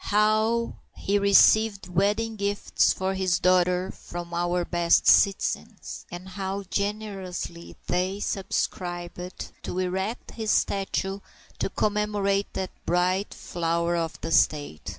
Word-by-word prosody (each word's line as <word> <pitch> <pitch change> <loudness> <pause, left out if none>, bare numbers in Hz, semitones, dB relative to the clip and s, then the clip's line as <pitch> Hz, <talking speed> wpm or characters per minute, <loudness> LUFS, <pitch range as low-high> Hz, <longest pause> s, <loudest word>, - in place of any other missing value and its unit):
How 215 +2 +2 0.2
he 200 +1 0
received 200 0 +5
wedding 205 +5 +1
gifts 200 -1 +1
for 190 +1 -1
his 185 -2 +1
daughter 180 0 +2
from 175 0 -8
our 175 +1 0
best 170 -1 +3
citizens; 200 -1 +2
and 175 +2 -8
how 195 +1 -4
generously 200 -4 -4
they 185 +3 -1
subscribed 180 -2 -3
to - - -5
erect 190 +5 -2
his 220 -2 -4
statue 195 -1 0 0.4
to - - 0
commemorate 205 -1 0
that 190 - -3
bright 180 +3 +1
flower 170 0 -1
of 165 -1 -2
the 165 - -4
State! 145 - +1
190 Hz, 115 wpm, -26 LUFS, 175-205 Hz, 0.4 s, received